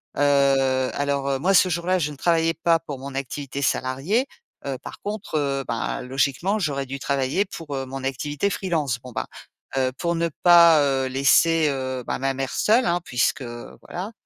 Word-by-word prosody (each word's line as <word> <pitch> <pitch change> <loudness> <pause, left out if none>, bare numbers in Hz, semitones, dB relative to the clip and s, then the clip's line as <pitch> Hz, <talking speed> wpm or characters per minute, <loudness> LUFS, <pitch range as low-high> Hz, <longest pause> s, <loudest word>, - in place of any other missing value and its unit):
Heu, - - -2 0.7
alors, 140 -1 -1
heu, 135 - -1
moi, 190 +5 +2
ce 185 - +5
jour-là, 175 +2 0
je 150 -4 -1
ne 145 - -10
travaillais 165 +2 +2
pas 165 0 +2
pour 145 -5 -7
mon 135 0 -8
activité 140 0 -4
salariée, 140 - 0 0.4
heu, 135 -2 -3
par - - -10
contre, 205 -5 -4
heu, 140 -1 -1
bah, 115 +1 -3
logiquement, 140 +10 0
j'aurais 140 -6 -1
dû 135 +1 -6
travailler 140 +8 0
pour, 160 -6 -7
heu, 135 0 -3
mon 135 0 -6
activité 145 +6 -2
freelance. 155 -11 -1
Bon, 125 +1 -11
bah, - - -4 0.5
heu, 130 -1 +1
pour 170 -1 0
ne 170 0 0
pas, 170 -3 +7
heu, 135 -2 +1
laisser, 150 +5 +3
heu, 130 -2 -3
bah, - - -2
ma 135 0 0
mère 135 0 -3
seule, 230 +4 +3
hein, 175 0 +1
puisque 130 +1 0
voilà. 125 - -8
140 Hz, 185 wpm, -23 LUFS, 135-170 Hz, 0.7 s, pas